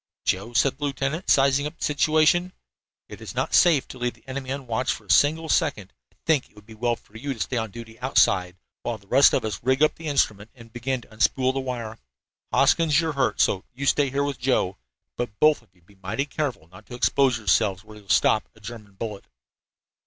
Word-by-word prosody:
"Joe," 100 +6 -1
said 135 +3 +2
the 145 - -2
lieutenant, 140 +5 -3
sizing 140 +1 +4
up 155 - -10
the - - -2
situation, 155 +4 +2 0.5
"it - - -11
is - - -8
not - - -2
safe 160 -6 +4
to 130 - -10
leave 125 0 -2
the - - -25
enemy 130 0 -5
unwatched 130 -2 -2
for - - -15
a - - -2
single 160 +3 +3
second. 145 - 0 0.2
I - - -32
think 155 -5 +1
it - - -31
would 105 0 -16
be 110 - -13
well 120 +2 0
for 110 - -26
you 135 +4 -4
to - - -14
stay 125 - -2
on 110 -1 -2
duty 115 +2 -11
outside, 95 -8 +2 0.2
while 120 -2 -3
the 100 - -23
rest 135 +7 +5
of - - 0
us 110 - -3
rig 130 +4 +2
up 155 - +4
the 165 - -7
instrument 110 -7 0
and 115 -2 -15
begin 125 +1 -2
to - - -18
unspool 130 +3 +1
the 135 - -2
wire. 120 -4 -5 0.5
Hoskins, 160 -3 +3
you're 160 -2 -1
hurt, 130 -7 0
so 95 - +2
you 140 +2 -4
stay 140 0 +2
here 140 +2 0
with 140 -2 -3
Joe. 120 -7 0 0.4
But 120 -4 -5
both 155 0 +4
of - - -27
you 90 -2 -30
be 100 +2 -23
mighty 110 +9 -2
careful 135 - -4
not 95 +1 -16
to 125 - -8
expose 130 0 +2
yourselves 105 -2 +1
where 110 0 -14
you'll 100 -1 -21
stop 110 - +3
a - - -19
German 105 -2 -10
bullet." 105 0 -6
125 Hz, 225 wpm, -24 LUFS, 110-140 Hz, 0.5 s, rest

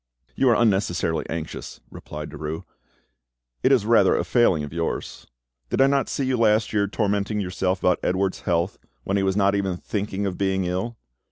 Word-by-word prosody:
"You 135 - +3
are 120 - +5
unnecessarily 95 -7 +1
anxious," 80 -1 -6
replied 75 0 -8
Derues; 80 +3 -5 1.0
"it - - +3
is - - +4
rather - - +5
a - - 0
failing 95 -11 +3
of 75 - -7
yours. 85 -1 -4 0.4
Did - - -1
I 135 - +7
not 140 0 +1
see 140 - -1
you 130 -1 +1
last 110 -1 +2
year 100 -1 +2
tormenting 105 0 -1
yourself 90 0 -1
about 90 - +3
Edouard's 95 +1 0
health, 85 +1 -1 0.2
when 100 - 0
he - - +1
was 95 0 +1
not 100 -1 +3
even 95 -3 -1
thinking 100 +1 -3
of 95 -2 -3
being 95 -1 +1
ill? 95 +7 -3
95 Hz, 180 wpm, -24 LUFS, 90-105 Hz, 1.0 s, I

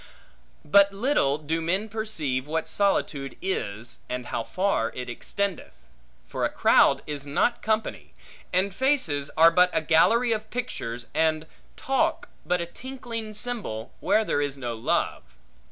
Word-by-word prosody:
But 200 +5 +6
little 195 - +1
do 155 +2 -2
men 185 +6 0
perceive 165 -12 -2
what 160 +1 -2
solitude 150 -8 0
is, 115 - -4
and 125 0 -4
how 115 - -3
far 185 - 0
it 125 -1 -5
extendeth. 195 - -3 0.5
For - - -4
a - - +2
crowd - - +4
is 145 -1 -6
not 195 +12 +1
company; 220 0 -2 0.4
and 190 +2 +1
faces 190 - +1
are 165 +1 +8
but 180 +2 +5
a - - +2
gallery 225 +10 +4
of 215 -1 -2
pictures; 125 - -4
and 155 0 +1 0.3
talk 325 +6 0 0.2
but 180 0 +2
a 170 - -2
tinkling 230 +1 -7
cymbal, 210 - -4
where 215 +3 +2
there 145 - 0
is 145 -1 -2
no 120 -3 -4
love. 115 0 -1
180 Hz, 145 wpm, -26 LUFS, 140-220 Hz, 0.5 s, are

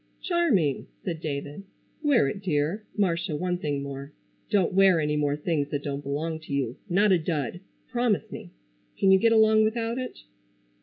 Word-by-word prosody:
"Charming!" 265 - +1 0.2
said 165 -3 -3
David. 145 +3 -4 0.4
"Wear 285 - +3
it, 165 +8 -4
dear. 175 +3 -1
Marcia, 170 -4 0
one 180 +3 -1
thing 145 -4 -2
more. 140 +1 -7 0.4
Don't 190 -3 +2
wear 190 -2 +5
any 150 -1 0
more 145 -1 +1
things 150 -1 -1
that 145 -1 -3
don't 140 -1 -3
belong 155 +3 -3
to 160 -3 -8
you. 130 -3 -2
Not 200 +3 +3
a 180 - +5
Dud. 160 -1 -2 0.3
Promise 240 -4 0
me? - - -8 0.5
Can 195 - +4
you 190 - +6
get 230 +2 +4
along 220 -1 +5
without 230 +2 -1
it?" 255 - -7
170 Hz, 170 wpm, -26 LUFS, 145-205 Hz, 0.5 s, you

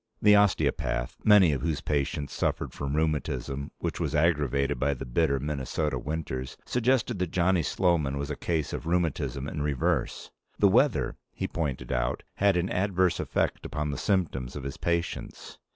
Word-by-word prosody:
The 105 0 +6
osteopath, 65 -11 +1
many 100 -6 +7
of 70 -4 -1
whose 80 -1 -1
patients 70 0 -1
suffered - - -1
from 70 0 -3
rheumatism 70 -3 -1
which - - -3
was 80 -2 -1
aggravated 75 -5 +1
by 70 +1 +1
the 65 - -6
bitter 70 +2 +1
Minnesota 75 +2 -2
winters, 70 -4 -4
suggested 125 -3 +1
that 90 -2 0
Johnny 90 +1 +2
Sloman 80 -5 +1
was 70 +1 -3
a - - -2
case 80 -2 -2
of - - -5
rheumatism 80 -5 -1
in 75 - -4
reverse. 70 -3 -1 0.3
The - - +5
weather, - - +2 0.2
he - - -2
pointed 75 -6 -3
out, - - -1
had 100 -2 +3
an 90 +2 -1
adverse 95 -2 +1
effect - - -1
upon 75 0 -3
the 70 - -4
symptoms 75 -11 -1
of 70 - -5
his 70 0 -5
patients. 85 0 -3
75 Hz, 165 wpm, -28 LUFS, 70-85 Hz, 0.3 s, many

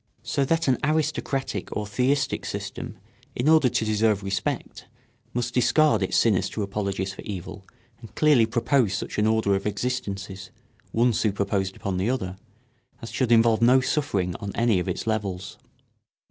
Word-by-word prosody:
So 140 - 0
that 165 +3 +1
an 130 -2 +2
aristocratic 150 -8 -1
or 105 - -2
theistic 130 +6 0
system - - -6 0.4
in 125 - -1
order 155 -5 +5
to 115 -2 0
deserve 105 -1 +1
respect 100 0 -3 0.4
must 120 0 -2
discard 150 +4 +3
its 95 - +1
sinister 105 -1 +1
apologies 100 -1 -3
for - - -9
evil 95 0 -7 0.3
and 115 -2 -13
clearly 145 -7 +4
propose 120 -2 +1
such - - -4
an 105 - +3
order 110 -2 +2
of 100 +1 -1
existences, 100 -4 -4 0.4
one 120 +1 +3
superposed 100 -2 0
upon 95 -2 -3
the 95 +5 0
other, 95 -8 -2 0.6
as 115 - -8
should 125 -3 0
involve 115 -1 +5
no 125 +3 +6
suffering 100 - -1
on 100 - -5
any 115 -5 +2
of 90 - -3
its - - -3
levels. 100 -4 -3
110 Hz, 155 wpm, -25 LUFS, 100-125 Hz, 0.6 s, no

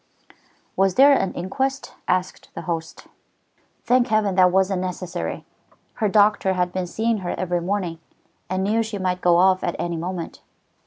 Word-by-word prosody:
"Was 195 -1 +2
there 280 +2 +7
an 195 -8 +1
inquest?" 265 +9 -3
asked 185 0 -1
the - - -6
host. 165 -2 -5 0.8
"Thank 250 0 +3
Heaven 215 -3 +1
that 180 -1 +5
wasn't 190 0 +1
necessary. 180 -1 -4 0.6
Her 215 - +3
doctor 205 -2 +3
had 180 -1 -1
been 185 -1 -2
seeing 225 +4 -1
her 180 -2 -3
every 175 -1 -1
morning, 180 -3 -2 0.5
and 185 +1 -1
knew 215 +3 +1
she 220 -2 -4
might 185 -1 -2
go 175 -1 +4
off 185 +1 +4
at 175 - -1
any 170 -1 -3
moment. 175 0 -5
185 Hz, 160 wpm, -22 LUFS, 180-210 Hz, 0.8 s, there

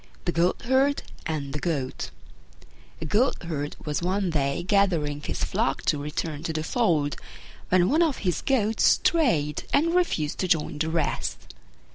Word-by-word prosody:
THE 175 - +1
GOATHERD 260 +12 +2 0.2
AND 145 -4 -3
THE 150 - -2
GOAT 145 -7 -2 0.9
A - - -3
Goatherd 170 - 0
was 150 +1 -1
one 185 +1 0
day 140 0 0
gathering 170 -7 +1
his - - -3
flock - - 0
to 150 - +1
return 150 0 -4
to 160 0 -3
the 155 0 -2
fold, 160 - +1 0.5
when 180 -1 +4
one 310 - +3
of 320 -5 +2
his 180 -3 0
goats 225 -5 +1
strayed 165 - +2
and 330 +4 +3
refused 260 - 0
to 185 - 0
join 155 -3 0
the 160 +1 0
rest. 160 - -2
170 Hz, 150 wpm, -26 LUFS, 150-215 Hz, 0.9 s, when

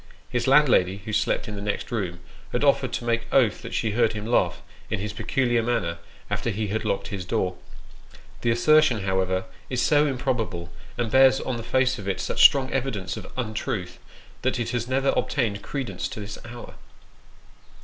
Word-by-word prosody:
His 120 +1 0
landlady, 120 -9 +4
who 110 - -4
slept 105 +1 +1
in 105 - -5
the 100 - -6
next 105 +4 -3
room, 90 -7 -3 0.3
has 125 - 0
offered 140 -3 +3
to 120 - -3
make 115 0 -1
oath 120 -6 +3
that - - -6
she 110 - 0
heard 115 +1 +2
him 105 -1 -5
laugh, 90 -7 +1 0.3
in - - -1
his 100 +1 -4
peculiar 120 -3 +1
manner, 110 -8 -1 0.3
after 100 +3 -2
he 105 -1 -2
had 110 +2 -1
locked 95 - -2
his 100 -3 -4
door. 90 0 -1 0.9
The 120 - +1
assertion, 130 -1 +4
however, 95 -1 0 0.2
is 130 - -1
so 145 +1 +3
improb 125 -2 0
able, 85 -5 -5 0.3
and 120 -3 -1
bears 135 0 +6
on 130 -2 -3
the - - -5
face 130 +2 +1
of 100 - -7
it 95 - -1
such - - -1
strong 135 -2 +6
evidence 115 -9 -2
of - - -9
untruth, 110 -6 -3 0.4
that 130 0 0
it 120 - -2
has 120 -1 -2
never 135 +1 +1
obtained 110 -7 0
credence 120 -10 -4
to - - -7
this 105 0 -7
hour. 120 +1 -9
115 Hz, 190 wpm, -25 LUFS, 100-130 Hz, 0.9 s, bears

